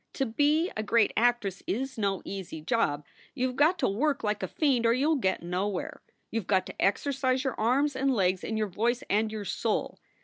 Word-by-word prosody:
" - - -51
To 270 - 0
be 295 +8 +2
a 215 - -1
great 220 +1 +2
actress 225 -5 +1
is 260 +5 -2
no 200 -3 -1
easy 190 -5 -6
job. 155 - 0 0.3
You 255 -1 0
ve - - -11
got 310 +7 +4
to - - +1
work 280 +8 0
like 210 -1 -1
a 190 - -2
fiend 265 - +1
or 230 - +4
you 280 +6 +2
ll - - +3
get 190 - 0
nowhere. 180 +2 -3 0.3
You 225 - -1
ve 185 - -19
got 190 -2 +2
to - - -8
exercise 260 +4 +1
your 265 -3 -1
arms 265 +6 +2
and 270 +1 +1
legs 185 -5 +1
and 220 - -2
your 215 - +1
voice 235 +7 -1
and 215 +2 +2
your 215 -2 -5
soul. - - -2
230 Hz, 225 wpm, -28 LUFS, 200-265 Hz, 0.3 s, got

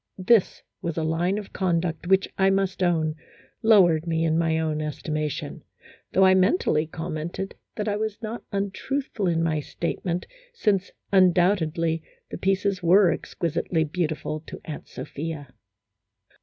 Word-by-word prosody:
This 225 -2 +3 0.2
was 170 -1 -3
a 160 - 0
line 170 +5 0
of 210 -2 -7
conduct 170 -2 -1
which, 190 +1 +4
I 190 0 +3
must 195 -1 0
own, 160 -3 +2 0.5
lowered 175 -8 +5
me 165 0 +1
in 160 -1 +2
my 165 -1 +2
own 155 -1 -1
estimation, 150 -1 -3 0.5
though 190 - +5
I 190 - +6
mentally 185 - +2
commented 165 +4 -5 0.2
that 210 0 -3
I 205 -1 0
was 215 -1 -3
not 225 +1 -5
untruthful 200 +3 -2
in 165 -1 +1
my 160 -2 +1
state 165 +3 -4
ment, 175 -1 -2 0.3
since, 200 - +1 0.2
undoubtedly, 175 -3 +3 0.3
the - - -5
pieces 195 0 +1
were 180 +1 +5
"exqui 170 - -4
sitely 160 -1 -1
beautiful 155 -3 -2
" - - -34
to - - -8
Aunt 155 - -7
Sophia. 150 -2 -6
175 Hz, 150 wpm, -25 LUFS, 160-195 Hz, 0.5 s, I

